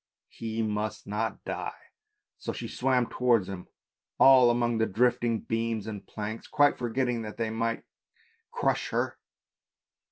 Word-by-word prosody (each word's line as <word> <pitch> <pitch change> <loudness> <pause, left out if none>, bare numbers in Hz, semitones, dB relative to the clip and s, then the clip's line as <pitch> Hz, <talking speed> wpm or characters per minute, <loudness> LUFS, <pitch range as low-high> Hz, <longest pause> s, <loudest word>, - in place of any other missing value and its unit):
he 115 0 -3
must 105 0 -2
not 105 +2 -3
die; - - -4 0.6
so - - -3
she - - -5
swam 125 -1 +1
towards 120 -6 +2
him 95 -2 -7 0.5
all 130 -2 +8
among 120 -1 +1
the 110 - +2
drifting 120 +1 +1
beams 115 -2 -2
and 105 -3 -7
planks, 110 +1 -5
quite 145 0 +4
forgetting 120 0 -1
that 105 -1 -7
they 115 -1 -1
might 115 +1 -1 0.7
crush 480 - 0
her. - - -1
115 Hz, 135 wpm, -28 LUFS, 110-120 Hz, 0.7 s, all